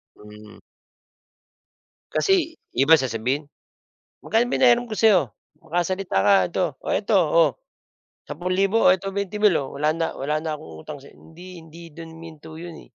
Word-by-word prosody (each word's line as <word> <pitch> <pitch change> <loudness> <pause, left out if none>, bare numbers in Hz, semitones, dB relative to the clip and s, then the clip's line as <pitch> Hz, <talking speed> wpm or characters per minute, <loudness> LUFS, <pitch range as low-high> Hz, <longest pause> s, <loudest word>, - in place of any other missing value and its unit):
Hmm. 105 0 -15 1.5
Kasi 335 -4 +1 0.2
iba 145 +6 +5
sasabihin, 130 +3 -2 0.7
"Magkano 235 +2 0
pinahiram 245 -1 +4
ko 220 - -7
sa'yo?" 210 -6 +5 0.4
"Makasalita 175 - -1
ka 100 0 +4 0.2
ito, 185 - 0 0.2
oh, - - -2
eto, 210 0 +1
oh, 165 -2 +3 0.8
10,000, 185 +7 +1
oh, - - +7
eto 195 +1 -7
20,000, 200 0 +1
oh, 135 - -8
wala 150 +2 +1
na 165 0 -1
wala 150 +3 -2
na 155 -2 -4
akong 80 - -12
utang 150 - -8
sa'y" - - -16
Hindi, 175 +1 -13
hindi 165 +1 -14
do'n 165 0 -10
huminto 160 -1 -12
'yon, 170 0 -9
eh. - - -14
165 Hz, 150 wpm, -23 LUFS, 150-195 Hz, 1.5 s, oh